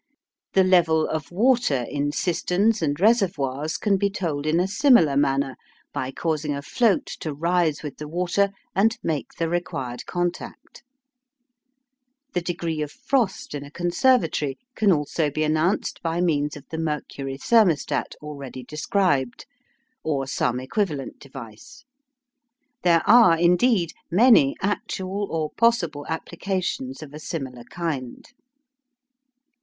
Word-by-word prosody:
The 190 - +5
level 170 -4 +3
of 155 +1 -4
water 215 - +2
in 145 0 -1
cisterns 185 +6 +1
and 145 -2 -1
reservoirs, 160 - +1
can 200 -2 +1
be 200 +1 +1
told 160 -7 -3
in 160 +2 +2
a 180 - +2
similar 195 - +4
manner 135 -1 +1 0.4
by 130 -3 -3
causing 150 0 -2
a 140 - -6
float 225 - +2
to 155 - -4
rise 165 -1 +1
with 145 -3 -6
the 150 - -7
water 180 +5 +1 0.3
and 225 +5 +3
make 155 -4 -2
the 165 - 0
required 135 -8 -4
contact. 175 -1 -4 1.5
The 180 - 0
degree 170 -2 -3
of 150 -1 -3
frost 235 - -1
in 145 -1 -4
a 145 - -10
conservatory 175 - +1 0.2
can 210 -4 +3
also 150 -1 0
be 155 +2 -1
announced 155 +6 0
by 165 -1 -1
means 150 -4 0
of 145 - -13
the 160 - -3
mercury 145 -3 -4
"thermostat," 195 -4 +2
already 140 -4 -7
described, 150 -2 0 0.6
or 140 -4 -1
some 125 -2 -1
equivalent 145 0 -3
device. 135 - -12 1.0
There 170 -2 +3
are, 225 -8 +7
indeed, 175 +1 +3 0.2
many 180 - +5
actual 195 0 -2
or 155 -2 -2
possible 175 -11 +1
applications 160 -5 -3
of 145 -1 -12
a 150 - -8
similar 130 -7 -6
kind. 145 -8 -5
160 Hz, 130 wpm, -24 LUFS, 145-190 Hz, 1.5 s, are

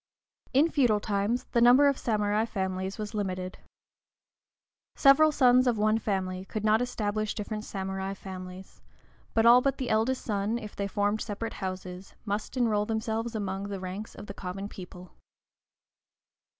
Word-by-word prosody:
In 300 +5 +4
feudal 245 -8 +3
times, 205 +4 -1
the 235 - +2
number 250 +4 +7
of 280 - +3
samurai 210 -3 0
families 190 -2 -3
was 210 0 -5
limited. 185 -3 -3 1.4
Several 305 +3 +6
sons 255 -3 +4
of 240 -3 +2
one 215 +1 +2
family 190 -3 -2
could 215 +2 -5
not 215 +2 +4
establish 215 -3 -2
different 215 0 -4
samurai 190 0 -4
families, 185 -1 -9 0.5
but 225 0 +3
all 240 +2 +8
but 275 0 0
the 260 -3 -2
eldest 225 +4 +1
son, 210 +1 -1
if 215 -3 -8
they 200 - -2
formed 205 +2 0
separate 225 +1 -4
houses, 185 0 -6
must 210 +4 -3
enroll 215 -4 +1
themselves 225 +1 -2
among 200 -1 -3
the 200 -1 -5
ranks 190 +4 -6
of 205 - -9
the 200 - -7
common 195 +1 -6
people. 180 -2 -11
210 Hz, 150 wpm, -28 LUFS, 195-230 Hz, 1.4 s, all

